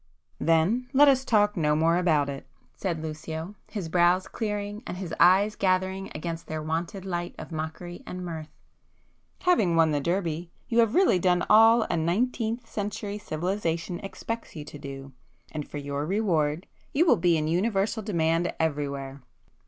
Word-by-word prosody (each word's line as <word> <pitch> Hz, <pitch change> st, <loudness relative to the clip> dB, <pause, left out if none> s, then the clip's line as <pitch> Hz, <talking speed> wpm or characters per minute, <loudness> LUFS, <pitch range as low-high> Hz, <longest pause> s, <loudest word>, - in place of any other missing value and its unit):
'" 80 Hz, -, -41 dB
"Then 185 Hz, +10 st, +2 dB
let 290 Hz, +2 st, +7 dB
us 265 Hz, -1 st, +4 dB
talk 210 Hz, -4 st, +3 dB
no 150 Hz, -4 st, +2 dB
more 165 Hz, +2 st, +3 dB
about 160 Hz, -5 st, +2 dB
it,"—said 160 Hz, +4 st, -6 dB
Lucio, 160 Hz, +3 st, -5 dB, 0.2 s
his 200 Hz, -6 st, -4 dB
brows 175 Hz, +2 st, +3 dB
clearing, 210 Hz, -1 st, -4 dB
and 180 Hz, -, -5 dB
his 180 Hz, -3 st, -5 dB
eyes 200 Hz, +4 st, +5 dB
gathering 190 Hz, 0 st, 0 dB
again 165 Hz, +2 st, -4 dB
their 155 Hz, -, -3 dB
wonted 170 Hz, +5 st, -3 dB
light 175 Hz, -2 st, -3 dB
of -, -, -9 dB
mockery 160 Hz, +2 st, -5 dB
and 180 Hz, 0 st, -5 dB
mirth—"Having 170 Hz, -, -3 dB
won 165 Hz, -1 st, +4 dB
the 145 Hz, -1 st, 0 dB
Derby, 170 Hz, 0 st, -1 dB, 0.2 s
you 235 Hz, -1 st, +1 dB
have 230 Hz, -1 st, +3 dB
really 365 Hz, -, +4 dB
done 180 Hz, -1 st, +2 dB
all 225 Hz, +2 st, +7 dB
a -, -, -1 dB
nineteenth 225 Hz, +7 st, -1 dB
century 205 Hz, 0 st, -4 dB
civilization 170 Hz, -1 st, -2 dB
expects 225 Hz, +3 st, -6 dB
you 150 Hz, -2 st, -6 dB
to 145 Hz, -, -10 dB
do, 135 Hz, -1 st, -8 dB, 0.4 s
and 150 Hz, -2 st, -5 dB
for -, -, -6 dB
your 140 Hz, 0 st, -3 dB
reward, 175 Hz, -5 st, 0 dB, 0.3 s
you 315 Hz, +5 st, +4 dB
will 330 Hz, -, +6 dB
be 170 Hz, -1 st, +3 dB
in 155 Hz, 0 st, -1 dB
universal 195 Hz, +5 st, 0 dB
demand 170 Hz, -4 st, +1 dB
everywhere. 140 Hz, -3 st, -2 dB
175 Hz, 160 wpm, -27 LUFS, 160-205 Hz, 0.4 s, let